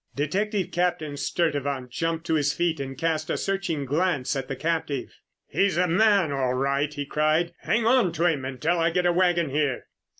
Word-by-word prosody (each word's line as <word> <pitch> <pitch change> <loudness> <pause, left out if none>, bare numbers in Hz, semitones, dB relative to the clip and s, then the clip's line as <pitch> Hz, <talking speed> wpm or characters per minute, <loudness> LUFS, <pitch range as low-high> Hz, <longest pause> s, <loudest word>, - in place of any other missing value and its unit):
Detective 195 +7 -1
Captain 170 -4 -1
Sturtevant 140 -5 -1
jumped 165 +3 -2
to 165 - 0
his 145 -2 +2
feet 165 +1 0
and 135 -1 -5
cast 160 -1 -1
a - - 0
searching 190 -7 -2
glance 150 -1 0
at 135 -1 -3
the 135 - -4
captive. 155 -2 -2 0.3
"He's 200 0 +1
the 180 +1 +2
man 195 -2 +3
all 130 -2 0
right," 140 +3 0
he 145 -1 -4
cried. 155 +4 +1
"Hang 230 0 0
on 235 -6 +4
to 170 - 0
him 155 -6 +1
until 130 +6 -1
I 165 0 +3
get 180 +2 0
a 175 - +3
wagon 175 -4 +2
here!" 145 -3 0
160 Hz, 190 wpm, -25 LUFS, 140-175 Hz, 0.3 s, on